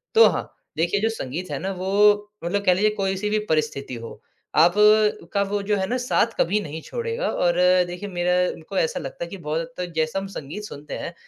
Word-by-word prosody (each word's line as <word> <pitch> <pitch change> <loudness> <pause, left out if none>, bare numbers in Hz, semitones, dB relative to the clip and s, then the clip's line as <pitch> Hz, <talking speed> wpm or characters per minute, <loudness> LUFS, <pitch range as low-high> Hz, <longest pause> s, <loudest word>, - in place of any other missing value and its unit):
तो 455 - +9
हाँ, - - -3 0.3
देखिए 175 +5 +1
जो 225 - +2
संगीत 180 - -5
है - - -2
ना, 195 +1 -3
वो 205 +2 +3
मतलब 200 +4 -1
कह 180 - +6
लीजिए 210 +4 +3
कोई-सी 195 +1 -1
भी 215 0 +1
परिस्थिति 150 -4 -1
हो, 115 0 -9 0.3
आपका 210 +4 +4
वो 200 +1 -2
जो 210 +1 +1
है 190 - 0
ना, 250 - 0
साथ 245 -2 +2
कभी 205 +5 +2
नहीं 160 -1 -6
छोड़ेगा। 470 +1 -3
और 175 -1 +1 0.3
देखिए, 180 +3 -6
मेरा 180 0 0 0.2
उनको 170 +4 -8
ऐसा 160 - +1
लगता 135 +5 -6
है - - -11
कि 195 - -7
बहुत 160 -1 -2
हद 165 - -6 0.2
तक 175 - -11
जैसा 160 +4 0
हम 195 - -6
संगीत 155 +9 -7
सुनते 150 -7 -8
हैं, 170 - -6
190 Hz, 215 wpm, -23 LUFS, 165-210 Hz, 0.3 s, तो